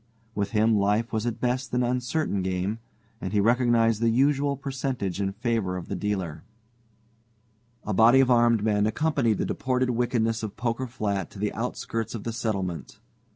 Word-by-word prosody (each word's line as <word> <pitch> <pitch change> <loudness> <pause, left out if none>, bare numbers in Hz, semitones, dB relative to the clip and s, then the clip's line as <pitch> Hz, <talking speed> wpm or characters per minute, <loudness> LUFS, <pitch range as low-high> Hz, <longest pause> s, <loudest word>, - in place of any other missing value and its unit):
With 100 -1 -1
him 110 +1 +3
life 105 +4 +1
was 110 +1 -1
at 120 - -3
best 125 +1 -1
an 125 - +2
uncertain 125 -2 -1
game, 95 +4 -2 0.4
and 95 - -4
he 105 - +3
recognized 115 0 +3
the 115 - +3
usual 140 +3 +2
percentage 130 -8 -3
in 95 -1 0
favor 110 -4 -1
of 90 - -8
the 100 - -2
dealer. 95 -5 -3 1.4
A 105 - -1
body 115 +6 +6
of 130 -1 +4
armed 120 -3 +4
men 105 -1 +2
accompanied 120 -3 +1
the - - -1
deported 130 -1 0
wickedness 115 -2 0
of 110 -3 -6
Poker 120 +2 -2
Flat 105 -5 -2
to - - -13
the 105 +1 -2
outskirts 115 -1 -3
of 110 - -6
the 115 - -3
settlement. 100 -7 -3
115 Hz, 170 wpm, -26 LUFS, 105-125 Hz, 1.4 s, body